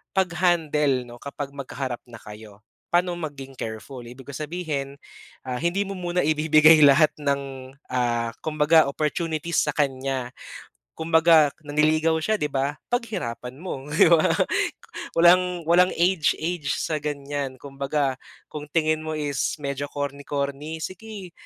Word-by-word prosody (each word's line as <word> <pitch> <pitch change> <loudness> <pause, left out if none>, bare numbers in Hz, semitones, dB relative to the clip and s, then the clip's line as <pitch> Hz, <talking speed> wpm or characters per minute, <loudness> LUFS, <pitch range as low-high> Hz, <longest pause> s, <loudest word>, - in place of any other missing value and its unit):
pag 190 -1 +2
handle 150 -7 +2
'no 120 0 -11
kapag 140 0 -6
magkaharap 130 -2 -5
na 120 - -11
kayo. 105 -1 -12 0.3
Pa'no 175 +1 +2
maging 140 -4 -6
careful? 110 +4 -6
Ibig 125 +3 -11
ko - - -12
sabihin, 150 -3 -4 0.5
ah 125 -1 -3
hindi 170 +5 0
mo - - -5
muna 180 0 -1
ibibigay 155 +1 +6
lahat 145 +2 +6
ng 135 -2 -3 0.2
ah 120 -2 0
kumbaga 155 +1 +4
opportunities 155 +2 -1
sa - - -1
kanya. 135 -3 -1 0.6
Kumbaga 160 -2 +4
nanliligaw 155 +2 +2
siya 215 - +2
'di 150 - 0
ba, 140 +2 -1
paghirapan 180 - -3
mo 145 -6 -6
'di 150 - +5
ba. 165 -2 +5 0.9
Walang 175 0 +4
walang 180 +2 +5
age-age 170 -3 +1
sa 155 -1 -2
ganyan. 140 -2 -4
Kumbaga 140 0 -2 0.4
kung 150 - -6
tingin 155 -1 +1
mo 155 - -4
is 145 -3 -1
medyo 140 0 -3
corny-corny, 145 +2 -4
sige 195 -1 -8
150 Hz, 130 wpm, -24 LUFS, 135-165 Hz, 0.9 s, ibibigay